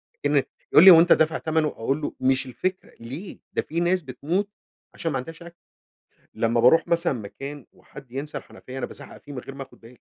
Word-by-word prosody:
أكن 145 -1 +1 0.3
يقول 155 - +8
لي: 190 - +12
"هو 165 - +9
أنت 175 +1 +6
دافع 160 +1 +2
تمَنه؟" 160 -1 0
أقول 135 +4 -2
له: - - -3
"مش 130 +1 +1
الفكرة، 185 +10 -4
ليه؟! 140 - -8
ده - - +1
في 165 +3 -3
ناس 180 +1 +2
بتموت 165 +9 -2 0.4
عشان 165 - -3
ما 135 - -1
عندهاش 165 +6 -8
أكل." 170 0 -13 0.8
لمّا 115 +1 +1
باروح 125 +7 +5
مثلًا 170 -2 +1
مكان 135 +5 -8
وحد 140 -3 -15
ينسى 140 +4 -5
الحنفية، 130 +1 -10
أنا 130 - -2
بازعق - - -12
فيه 145 - -12
من 130 - -5
غير 135 +2 -10
ما 135 - -6
آخد - - -19
بالي. 115 - -14
145 Hz, 210 wpm, -24 LUFS, 130-165 Hz, 0.8 s, لي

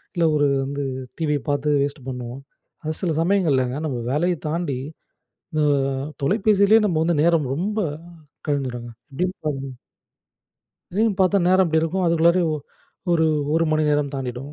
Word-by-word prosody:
இல்ல 170 -1 +2
ஒரு 145 -1 +3 0.2
வந்து 140 +1 -3 0.4
டிவி 150 -3 +1
பார்த்து 145 +1 +1
வேஸ்ட்டு 140 -2 -3
பண்ணுவோம். 125 0 -6 0.4
அது 155 0 -2
சில 175 -4 0
சமயங்கள்லங்க, 150 -9 +1
நம்ம 125 -4 -3
வேலைய 170 +4 +1
தாண்டி 155 -6 -2 0.8
அ - - +3 0.6
தொலைபேசிலே 205 +4 +4
நம்ம 175 -6 +1
வந்து 170 +1 +1
நேரம் 165 -4 +3
ரொம்ப 210 +6 -2 0.7
கழிஞ்சிடும்ங்க. 125 -4 -2 0.2
எப்படின்னு 180 +6 -1
பாத்தீங்கனா 135 -3 -4 1.1
திடீர்னு 215 +3 +1
பார்த்தா 190 +2 +4
நேரம் 185 0 +4
இப்படி 160 -1 +2
இருக்கும் 180 +3 0
அதுக்குள்ளாரே 170 +2 +4
ஒ - - 0 0.6
ஒரு, 160 -1 +3 0.3
1 165 - +3
மணி 155 0 +2
நேரம் 145 -1 +1
தாண்டிடும். 135 +1 -5
155 Hz, 140 wpm, -22 LUFS, 140-180 Hz, 1.1 s, தொலைபேசிலே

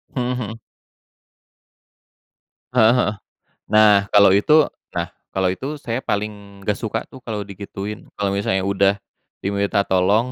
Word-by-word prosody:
Mmm 125 -1 -1
mhm. 115 -1 -6 2.1
Heeh 115 -2 +6
heeh. 125 -4 +1 0.6
Nah 105 -2 +6
kalo 100 -1 +7
itu 145 +11 +4 0.2
nah 85 -1 -2 0.2
kalo 95 -1 +1
itu 130 +11 -4
saya 120 +2 -4
paling 100 -1 -4
nggak 105 +1 -1
suka 110 -1 -3
tuh - - -12
kalo 110 -3 -3
digituin. 100 +1 -7
Kalo 100 -1 -1
misalnya 95 -1 0
udah 100 0 +2 0.5
diminta 100 +1 0
tolong, 100 +6 +2
100 Hz, 130 wpm, -21 LUFS, 100-110 Hz, 2.1 s, kalo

